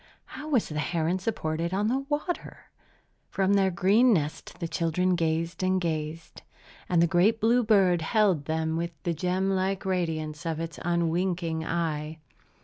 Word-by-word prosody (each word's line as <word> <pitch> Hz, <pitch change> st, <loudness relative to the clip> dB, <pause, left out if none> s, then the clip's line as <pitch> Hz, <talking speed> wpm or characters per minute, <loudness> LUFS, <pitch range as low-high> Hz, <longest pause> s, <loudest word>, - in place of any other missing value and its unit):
How 300 Hz, +1 st, -8 dB
was 255 Hz, -7 st, +2 dB
the 150 Hz, -1 st, -3 dB
heron 165 Hz, +3 st, 0 dB
supported 170 Hz, -4 st, -2 dB
on 205 Hz, +2 st, +1 dB
the 270 Hz, +4 st, -1 dB
water? 305 Hz, +4 st, -4 dB, 0.6 s
From 195 Hz, 0 st, +1 dB
their 195 Hz, -1 st, +3 dB
green 200 Hz, +8 st, +4 dB
nest 155 Hz, -7 st, -2 dB
the 170 Hz, -, -2 dB
children 165 Hz, +3 st, 0 dB
gazed 165 Hz, 0 st, -1 dB
and 185 Hz, 0 st, +2 dB
gazed; 160 Hz, -1 st, -4 dB, 0.5 s
and 170 Hz, -2 st, +4 dB
the -, -, +6 dB
great 190 Hz, +6 st, +3 dB
blue 235 Hz, +3 st, +3 dB
bird 195 Hz, -6 st, +4 dB
held 185 Hz, -4 st, +2 dB
them 160 Hz, +1 st, -1 dB
with 170 Hz, +1 st, -3 dB
the 170 Hz, -3 st, 0 dB
gem 185 Hz, +4 st, 0 dB
like 190 Hz, 0 st, -1 dB
radiance 160 Hz, -5 st, -2 dB
of 165 Hz, -2 st, -2 dB
its 165 Hz, 0 st, -5 dB
unwinking 170 Hz, -1 st, 0 dB
eye. 160 Hz, -2 st, -2 dB
175 Hz, 155 wpm, -27 LUFS, 160-195 Hz, 0.6 s, the